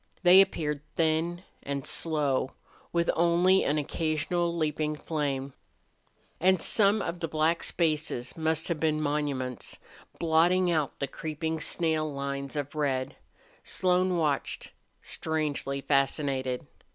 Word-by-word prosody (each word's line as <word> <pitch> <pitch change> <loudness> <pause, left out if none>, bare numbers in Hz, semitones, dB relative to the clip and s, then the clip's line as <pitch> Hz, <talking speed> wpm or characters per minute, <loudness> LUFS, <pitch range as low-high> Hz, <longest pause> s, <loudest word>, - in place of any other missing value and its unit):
They 180 +2 +9
appeared 150 -6 -1
thin 165 +2 0 0.2
and 140 -1 -4
slow, 145 -5 +1 0.4
with 170 0 +2
only 175 +3 +4
an 145 - +1
occasional 160 +3 -1
leaping 155 -2 -1
flame. 140 -3 -3 0.9
And 185 +1 +4
some 205 +2 +2
of 170 - -4
the 165 - -2
black 160 +2 +1
spaces 155 -6 -1
must 160 0 0
have 170 -3 -1
been 155 -1 +1
monuments, 145 -4 -2 0.4
blotting 175 +2 +3
out 155 -4 0
the 140 - -1
creeping 160 +3 -4
snail 160 -2 0
lines 140 0 -4
of 145 -1 -3
red. 135 -4 -1 0.5
Slone 185 0 +1
watched, 150 -4 -1 0.3
strangely 150 -3 -2
fascinated. 135 -2 0
155 Hz, 115 wpm, -28 LUFS, 140-170 Hz, 0.9 s, They